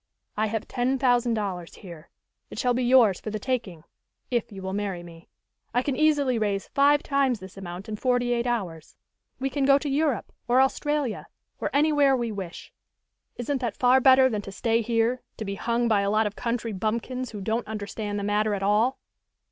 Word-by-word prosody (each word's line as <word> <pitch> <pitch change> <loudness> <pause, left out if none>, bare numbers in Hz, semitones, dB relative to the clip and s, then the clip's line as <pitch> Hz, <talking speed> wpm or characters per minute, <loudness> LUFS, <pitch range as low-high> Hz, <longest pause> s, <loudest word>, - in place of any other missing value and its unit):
"I 215 +1 +1
have 220 0 -3
ten 255 +2 0
thousand 245 -2 +2
dollars 185 -5 -4
here. 170 -5 -12 0.4
It - - -10
shall 250 -2 +1
be 250 +1 0
yours 240 -6 +5
for - - -6
the 215 - -3
taking 210 -9 -3 0.5
if 240 -3 -1
you 195 -2 -9
will 190 0 -4
marry 195 -4 -3
me. 170 -1 -13 0.5
I 245 - +3
can 275 -1 -1
easily 285 -4 +2
raise 200 -2 -1
five 285 +1 +3
times 275 -5 +1
this 190 0 -11
amount 185 0 -8
in 215 -1 -4
forty 245 0 +1
eight 240 0 -1
hours. 180 -10 -4 0.4
We 270 +1 -2
can 285 0 -1
go 275 0 +6
to 285 - -4
Europe, 285 -3 0
or 245 +1 +4
Australia, 275 -2 0 0.3
or - - -1
anywhere 290 -2 +3
we 235 -2 -2
wish. 195 -5 -7 0.6
Isn't 265 +3 -2
that 240 - -3
far 255 +1 +5
better 260 0 +7
than 215 -5 -2
to 195 - -9
stay 225 +3 +1
here, 230 +2 0 0.2
to 220 - -5
be 200 - -3
hung 235 +5 0
by 215 -3 +3
a 200 - 0
lot 215 +1 +2
of 205 0 -3
country 235 -2 -2
bumpkins, 235 +5 -2
who 210 - -7
don't 220 +4 -2
understand 210 -1 -4
the 200 - -3
matter 210 +1 +1
at 195 - -4
all?" 215 +6 +2
230 Hz, 200 wpm, -26 LUFS, 205-255 Hz, 0.6 s, better